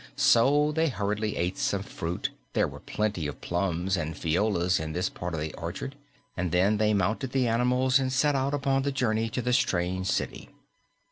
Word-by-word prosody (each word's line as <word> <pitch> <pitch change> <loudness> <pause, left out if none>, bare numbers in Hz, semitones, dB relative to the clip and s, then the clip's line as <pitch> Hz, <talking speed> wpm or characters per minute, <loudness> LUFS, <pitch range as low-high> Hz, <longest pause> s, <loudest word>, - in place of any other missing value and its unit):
So 145 +6 +4
they 160 +2 +1
hurriedly 105 -2 -2
ate 90 +2 -1
some 100 -1 0
fruit 85 -2 -4 0.2
there - - +2
were - - -9
plenty 105 -7 -2
of 75 - -7
plums 90 +1 -1
and 80 -3 -3
fijoas 90 +2 +1
in 80 0 -4
this 90 +2 0
part 90 -1 -5
of - - -3
the 75 0 -4
orchard 85 +11 -5 0.4
and 90 -1 -2
then 95 +4 +3
they 110 0 +2
mounted 110 +7 0
the 130 -2 +2
animals 125 +3 +3
and 130 -1 -1
set 145 +3 +2
out 135 +1 0
upon 135 -1 +1
the 140 +1 -1
journey 115 -4 0
to 125 +2 -3
the 125 - +1
strange 95 -6 +1
city. - - -2
105 Hz, 190 wpm, -28 LUFS, 90-130 Hz, 0.4 s, So